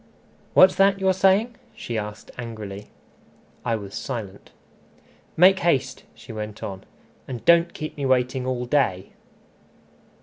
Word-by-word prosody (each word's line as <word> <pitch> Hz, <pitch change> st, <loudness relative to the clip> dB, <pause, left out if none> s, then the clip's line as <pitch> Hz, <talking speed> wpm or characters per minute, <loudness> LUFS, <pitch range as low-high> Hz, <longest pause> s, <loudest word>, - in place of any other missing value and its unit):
"What's 185 Hz, 0 st, +8 dB
that 195 Hz, 0 st, +4 dB
you're 190 Hz, -1 st, +2 dB
saying?" 195 Hz, +5 st, +2 dB, 0.2 s
she 120 Hz, -, -6 dB
asked 105 Hz, 0 st, -6 dB
angrily. 105 Hz, -4 st, -7 dB, 0.8 s
I 115 Hz, -2 st, 0 dB
was 100 Hz, -2 st, -8 dB
silent. 110 Hz, -8 st, -6 dB, 0.9 s
"Make 185 Hz, +3 st, +6 dB
haste," 135 Hz, -6 st, 0 dB
she 115 Hz, -, -11 dB
went 105 Hz, -1 st, -7 dB
on, 95 Hz, -1 st, -6 dB, 0.4 s
"and 125 Hz, -3 st, -7 dB
don't 170 Hz, 0 st, +5 dB
keep 155 Hz, -1 st, -6 dB
me 140 Hz, -2 st, -1 dB
waiting 130 Hz, 0 st, +1 dB
all 125 Hz, -1 st, -2 dB
day." 110 Hz, -9 st, 0 dB
125 Hz, 130 wpm, -23 LUFS, 105-170 Hz, 0.9 s, What's